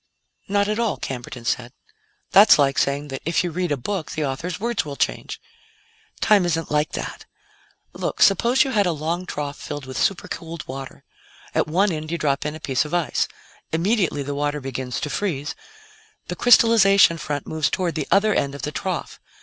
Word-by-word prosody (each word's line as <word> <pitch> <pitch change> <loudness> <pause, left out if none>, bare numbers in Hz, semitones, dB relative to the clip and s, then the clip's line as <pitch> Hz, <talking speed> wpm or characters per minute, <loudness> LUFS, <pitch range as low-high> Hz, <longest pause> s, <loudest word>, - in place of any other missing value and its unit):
"Not 200 0 +1
at 215 +2 -1
all," 230 -3 0
Camberton 125 -2 -6
said; 125 +1 -2 0.6
"that's 205 +2 +8
like 140 -2 +2
saying 140 +1 0
that 135 -1 -5
if 165 +3 +1
you 175 - -2
read 175 0 -2
a 145 - +1
book, 180 +6 -4
the 155 - -1
author's 150 +6 -4
words 235 -2 -1
will 145 -2 -6
change. - - -2 0.8
"Time 210 -3 +5
isn't 165 -2 -1
like 150 0 +1
that. - - -6 0.7
Look, - - -4
suppose 235 +8 +4
you 270 - -3
had 205 -5 +2
a 175 - +1
long 165 +4 -3
trough 145 -1 -4
filled 145 -2 -6
with 130 -1 -5
supercooled 170 -4 -3
water. 135 0 -8 0.5
At - - +1
one 190 +6 +2
end, 155 -1 -4
you 170 - -1
drop 145 -2 0
in 150 - -4
a - - -8
piece 135 -2 0
of 150 +3 -4
ice. 175 -3 0 0.4
Immediately 175 -3 +1
the 140 +1 -4
water 145 +1 -1
begins 130 -2 -4
to 150 - -2
freeze; 150 -7 -2 0.8
the 180 - -3
crystallization 200 -6 +6
front 145 -1 -3
moves 160 -1 0
toward 180 -3 -1
the 155 -3 -3
other 210 +2 +4
end 140 -5 0
of 140 - -9
the 150 - -2
trough. 180 +1 -4
160 Hz, 190 wpm, -23 LUFS, 145-190 Hz, 0.8 s, that's